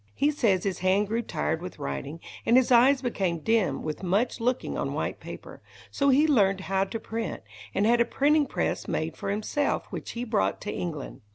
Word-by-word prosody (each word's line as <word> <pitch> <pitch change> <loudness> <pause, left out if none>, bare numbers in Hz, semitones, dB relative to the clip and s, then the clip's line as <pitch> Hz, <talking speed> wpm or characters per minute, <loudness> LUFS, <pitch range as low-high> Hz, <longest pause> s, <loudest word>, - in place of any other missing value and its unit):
He 290 +2 +2
says 210 -11 +2
his 195 -3 -2
hand 190 +3 +2
grew 230 +2 0
tired 160 -5 -2
with 180 0 -7
writing, 105 - -5 0.2
and 235 +2 +4
his 260 0 +3
eyes 260 +3 +5
became 190 -8 0
dim 220 +5 +1
with 155 -1 -4
much 195 +6 0
looking 245 +2 -1
on - - -2
white - - -2
paper. - - -10 0.3
So 280 0 +2
he 280 +3 +5
learned 195 -10 +3
how 190 0 0
to 225 +3 -5
print, 225 +1 -4 0.3
and 200 - +2
had 235 +1 +4
a - - +4
printing 290 +3 +2
press - - -2
made 160 +1 -2
for 200 - -5
himself, 215 +8 -1
which - - -6
he 235 - -4
brought 220 -4 0
to 210 - -4
England. 155 -6 -5
215 Hz, 200 wpm, -27 LUFS, 185-245 Hz, 0.3 s, eyes